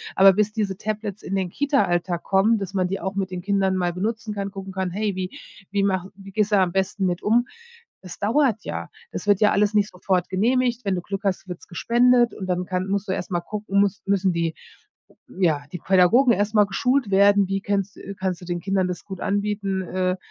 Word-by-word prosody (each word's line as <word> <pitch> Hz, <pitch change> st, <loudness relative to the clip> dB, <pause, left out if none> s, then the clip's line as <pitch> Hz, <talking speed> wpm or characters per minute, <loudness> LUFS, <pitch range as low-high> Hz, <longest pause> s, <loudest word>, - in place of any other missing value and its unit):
aber 195 Hz, 0 st, +8 dB
bis 210 Hz, +2 st, 0 dB
diese 200 Hz, -4 st, -2 dB
Tablets 210 Hz, -1 st, -4 dB
in 195 Hz, -, -4 dB
den 185 Hz, -2 st, -1 dB
Kita-Alltag 180 Hz, -, 0 dB
kommen, 205 Hz, +4 st, +3 dB
dass 195 Hz, -1 st, -5 dB
man 185 Hz, -2 st, +1 dB
die 195 Hz, +1 st, -3 dB
auch 190 Hz, +1 st, -3 dB
mit 190 Hz, -2 st, -2 dB
den 180 Hz, -, -4 dB
Kindern 195 Hz, 0 st, +1 dB
mal 180 Hz, -1 st, 0 dB
benutzen 215 Hz, +4 st, -3 dB
kann, 200 Hz, -1 st, -3 dB
gucken 195 Hz, -1 st, -7 dB
kann: 190 Hz, -1 st, -2 dB
„Hey, 205 Hz, +2 st, -1 dB
wie 185 Hz, -1 st, -4 dB, 0.3 s
wie 200 Hz, -1 st, +1 dB
mache 190 Hz, -1 st, 0 dB
wie 195 Hz, 0 st, -12 dB
gehst 210 Hz, +1 st, 0 dB
du 205 Hz, -, +6 dB
am 185 Hz, -2 st, +2 dB
besten 190 Hz, +1 st, -1 dB
mit 175 Hz, 0 st, -1 dB
um?“ 235 Hz, +3 st, +3 dB, 0.6 s
Das 180 Hz, -2 st, -10 dB
dauert 225 Hz, 0 st, +1 dB
ja, 85 Hz, 0 st, -5 dB, 0.2 s
das 180 Hz, -, -5 dB
wird 205 Hz, -2 st, +4 dB
ja 210 Hz, -, +5 dB
alles 205 Hz, +1 st, +2 dB
nicht 210 Hz, -1 st, +2 dB
sofort 180 Hz, 0 st, -1 dB
genehmigt, 240 Hz, +4 st, +1 dB
wenn 195 Hz, -, 0 dB
du 180 Hz, -, -2 dB
Glück 195 Hz, +2 st, -5 dB
hast, 190 Hz, -2 st, -1 dB
wird's 180 Hz, -, -8 dB
gespendet 240 Hz, +5 st, +3 dB
und 190 Hz, -, -6 dB
dann 180 Hz, 0 st, 0 dB
kann 185 Hz, 0 st, -2 dB
musst 200 Hz, +1 st, -1 dB
du -, -, 0 dB
erst 185 Hz, -, -4 dB
mal 175 Hz, -, 0 dB
gucken, 200 Hz, +1 st, -1 dB
muss 200 Hz, 0 st, +1 dB
müssen 195 Hz, -2 st, +1 dB
die 165 Hz, -1 st, -1 dB, 0.8 s
ja, 165 Hz, -6 st, 0 dB
die 180 Hz, -, -5 dB
Pädagogen 195 Hz, +9 st, +4 dB
erst 205 Hz, +1 st, 0 dB
mal 210 Hz, -2 st, +5 dB
geschult 250 Hz, +3 st, 0 dB
werden, 200 Hz, 0 st, +5 dB
wie 195 Hz, +1 st, -2 dB
kennst 200 Hz, -1 st, -1 dB
äh, 200 Hz, -, -8 dB
kannst 185 Hz, -1 st, -2 dB
du -, -, -9 dB
den 175 Hz, 0 st, -3 dB
Kindern 195 Hz, 0 st, 0 dB
das 175 Hz, -2 st, -6 dB
gut 190 Hz, -2 st, -8 dB
anbieten? 200 Hz, -1 st, -1 dB
Äh, 185 Hz, 0 st, -1 dB
195 Hz, 225 wpm, -23 LUFS, 185-210 Hz, 0.8 s, aber